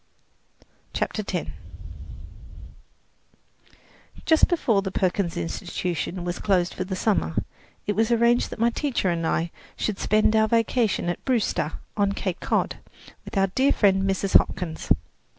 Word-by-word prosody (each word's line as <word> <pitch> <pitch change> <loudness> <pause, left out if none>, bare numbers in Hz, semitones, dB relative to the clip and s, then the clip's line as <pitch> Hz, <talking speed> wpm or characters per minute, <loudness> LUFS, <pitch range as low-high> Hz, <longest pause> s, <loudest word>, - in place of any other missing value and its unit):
CHAPTER - - -1
X - - -3 2.7
Just 320 -1 +5
before 235 - +2
the 195 - -3
Perkins 185 -2 0
Institution 175 +1 -3
closed 180 -2 +1
for 185 - -3
the 190 +1 -4
summer, 185 - 0 0.5
it 205 - -1
was 225 +1 +2
arranged 235 +1 +3
that - - -7
my 230 +1 +2
teacher 240 -9 0
and 165 -1 -1
I 165 +1 0 0.2
should 210 -3 -2
spend 215 +1 +3
our 220 0 +4
vacation 230 -3 +1
at 175 - -3
Brewster, 225 - 0 0.2
on 200 -1 +1
Cape 185 -3 -3
Cod, - - 0 0.5
with - - -6
our 195 -1 +2
dear 270 +2 +3
friend, 195 -2 +3
Mrs. 195 0 0
Hopkins. 160 -3 -4
195 Hz, 135 wpm, -25 LUFS, 180-225 Hz, 2.7 s, Just